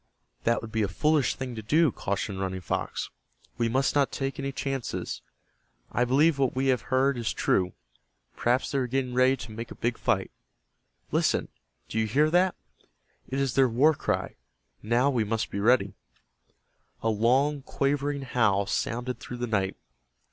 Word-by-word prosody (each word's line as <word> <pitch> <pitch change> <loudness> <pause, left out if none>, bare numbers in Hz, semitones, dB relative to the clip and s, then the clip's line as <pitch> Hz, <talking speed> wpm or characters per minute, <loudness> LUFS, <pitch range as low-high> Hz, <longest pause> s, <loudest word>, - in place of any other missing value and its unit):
"That 115 0 +2
would 110 - -7
be 110 - 0
a 105 - +2
foolish 145 - +2
thing 130 -2 -5
to 110 - -5
do," 155 +7 +3
cautioned 100 -1 -3
Running 95 -1 -2
Fox. - - -3 0.5
"We 115 -1 +2
must 135 +3 +1
not 140 -2 +2
take 135 0 -3
any 140 0 -2
chances. 135 -2 -3 0.7
I 120 - +2
believe 140 +4 +3
what 135 -2 +1
we 135 +1 +1
have 125 - -3
heard 135 0 +2
is 115 - -1
true. 90 -1 +1 0.6
Perhaps 125 +2 +1
they 140 - +1
are 125 - 0
getting 130 0 -1
ready 130 +2 +4
to 110 -2 -8
make 115 +2 -6
a - - -9
big 120 0 -2
fight. - - 0 0.8
Listen. - - +1 0.4
Do 110 - -2
you 110 - +1
hear 150 +8 +3
that? 180 +1 +3 0.7
It 135 - -2
is 135 -3 0
their 135 -1 +4
war 140 +7 +4
cry. - - -2 0.4
Now 120 +6 +2
we 120 -4 +1
must 110 +1 -2
be 100 - -3
ready." 105 -2 +3 1.1
A 115 - +2
long, 130 +7 +2
quavering 140 +1 -1
howl 105 -6 +2
sounded 120 +4 -2
through 125 - -7
the 120 - -2
night. 100 -4 0
125 Hz, 170 wpm, -27 LUFS, 110-135 Hz, 1.1 s, ready